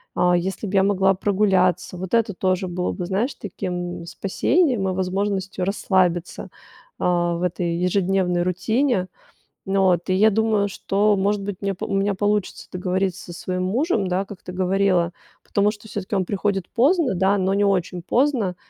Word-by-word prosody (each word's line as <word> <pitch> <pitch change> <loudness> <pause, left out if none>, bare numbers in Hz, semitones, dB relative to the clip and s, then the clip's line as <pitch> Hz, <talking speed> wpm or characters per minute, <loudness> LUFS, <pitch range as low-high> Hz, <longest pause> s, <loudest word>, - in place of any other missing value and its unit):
А 180 0 +3
если 190 +4 -2
б 195 - -6
я 195 - +5
могла 195 -1 +3
прогуляться, 190 -2 +1
вот 185 +3 -6
это 225 -3 +1
тоже 185 +1 0
было 180 0 -2
бы, 180 -2 -4
знаешь, 210 +9 -1
таким, 180 -2 -5
м, 170 - -9
спасением 230 - +1
и - - -1
возможностью 190 0 -2
расслабиться, 185 -3 0 0.5
а, 175 -1 +1
в 170 - -4
этой 175 -1 -1
ежедневной 180 0 +1
рутине. 190 +3 0 0.6
Ну, 195 -1 +3
от, 175 0 -1
и 185 - +3
я 215 +3 +5
думаю, 215 -1 +1
что, 205 +2 +1
может 200 +1 +1
быть, 195 -2 -5
меня 195 -1 -1
у - - -3
меня 195 0 +1
получится 205 0 -1
договориться 185 0 -2
со 175 - -9
своим 185 +1 -3
мужем, 220 - 0
да, 185 +2 -1
как 195 -1 -11
ты - - -7
говорила. 185 -1 +1 0.4
Потому 205 +1 +2
что 215 0 -13
всё-таки 205 -1 -4
он 190 -2 +1
приходит 195 -1 -1
поздно, 290 - +2
да, 190 +3 +2
но 190 0 +1
не 205 +1 +2
очень 185 -2 0
поздно. 235 - +1
190 Hz, 175 wpm, -22 LUFS, 180-205 Hz, 0.6 s, я